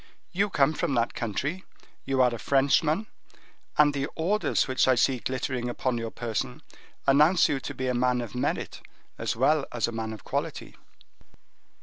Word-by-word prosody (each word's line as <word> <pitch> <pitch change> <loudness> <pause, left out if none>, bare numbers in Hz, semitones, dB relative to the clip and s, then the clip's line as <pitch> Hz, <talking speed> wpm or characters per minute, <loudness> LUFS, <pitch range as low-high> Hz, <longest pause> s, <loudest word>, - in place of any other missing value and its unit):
You 200 +4 +1
come 145 -3 +3
from 160 -3 -1
that 115 0 +1
country, 140 - -3 0.4
you 135 -1 +2
are 125 -1 +3
a 115 - -5
Frenchman, 150 +7 +2 0.7
and 150 -1 +5
the 140 0 -1
orders 195 +6 +1
which 130 -1 +2
I 130 - +5
see 125 +1 +2
glittering 130 -1 -2
upon 120 0 -1
your 115 0 -3
person 115 -1 -4 0.4
announce 150 +6 +5
you 140 - -1
to - - -6
be 130 - -3
a 125 - +1
man 125 0 +2
of 120 -3 -5
merit 125 - -2 0.4
as - - -1
well 140 +5 +3
as 120 -2 0
a - - -4
man 110 -1 -4
of 110 -3 -9
quality." - - -4
130 Hz, 170 wpm, -27 LUFS, 120-150 Hz, 0.7 s, and